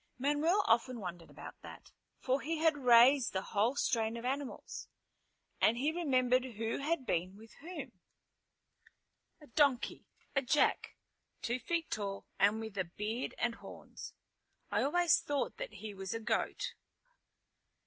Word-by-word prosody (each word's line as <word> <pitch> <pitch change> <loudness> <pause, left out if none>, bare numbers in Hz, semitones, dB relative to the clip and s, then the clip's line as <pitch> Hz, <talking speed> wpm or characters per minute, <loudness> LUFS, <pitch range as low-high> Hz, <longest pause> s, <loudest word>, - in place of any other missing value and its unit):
Manuel 295 +9 +2
often 235 +2 +2
wondered 175 -4 -7
about - - -11
that, - - -12 0.3
for 265 +1 0
he 325 +1 -2
had 320 -1 +3
raised 250 0 +6
the 190 0 -1
whole 220 +7 +1
strain 230 -4 0
of 235 - -7
animals, 270 +1 -4 0.7
and 230 - +4
he 285 +5 +1
remembered 255 -6 +2
who 225 -3 -3
had 300 -1 -1
been 185 +1 -1
with 225 +1 -15
whom. 350 +4 -7 1.5
"A - - -12
donkey! 280 -2 +1 0.3
A 275 - +4
jack! 285 +3 +1 0.5
Two 240 +2 -1
feet 330 +6 -2
tall 200 -2 -3
and 205 +2 +4
with 220 -3 -6
a 185 - +1
beard 210 +8 -4
and 240 -1 0
horns. - - -10 0.6
I - - +2
always 345 +4 +4
thought 290 -1 -2
that - - -6
he 215 -1 -7
was 195 +1 -5
a - - -2
goat." 225 0 -1
250 Hz, 145 wpm, -34 LUFS, 220-290 Hz, 1.5 s, raised